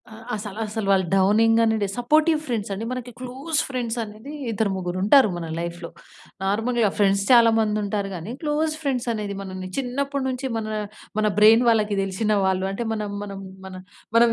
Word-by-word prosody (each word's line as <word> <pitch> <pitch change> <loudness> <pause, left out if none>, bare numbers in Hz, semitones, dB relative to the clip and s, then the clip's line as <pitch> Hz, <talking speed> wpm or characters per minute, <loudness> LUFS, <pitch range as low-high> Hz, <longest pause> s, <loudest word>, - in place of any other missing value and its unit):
ఆహ్, 220 0 -11
అసల 210 -1 -6
అసలు 215 -1 -4
వాళ్ళు 190 -1 +3
డౌనింగేనండి. 220 +2 +3
సపోర్టివ్ 305 +6 +3
ఫ్రెండ్సండి. 215 -4 -3
మనకి 250 -1 -5
క్లోజ్ 265 +5 -3
ఫ్రెండ్సనేది 235 -1 -4 0.2
ఇద్దరు 220 -1 0
ముగ్గురుంటారు 190 +8 +4
మన 170 - -5
లైఫ్‌లో. 170 0 -5 0.5
నార్మల్‌గా 225 +3 +1
ఫ్రెండ్స్ 200 -1 +3
చాలా 235 -2 +7
మందుంటారు 210 -2 -1
గానీ, 175 +5 -6
క్లోజ్ 310 +1 0
ఫ్రెండ్సనేది 235 -7 -2
మనని 185 -1 -6
చిన్నప్పుడు 275 +2 -2
నుంచి 260 +1 -3
మనా, 215 -1 -3 0.4
మన 215 - +2
బ్రెయిన్ 225 +3 +7
వాళ్ళకి 215 -3 +2
తెలిసిన 195 +3 -1
వాళ్ళు. 190 0 +1
అంటే, 230 +4 -3
మనం 210 -1 -3
మనం 200 -1 -7 0.3
మన 190 - -8 0.4
మనం 235 0 +6
220 Hz, 145 wpm, -23 LUFS, 200-245 Hz, 0.5 s, చాలా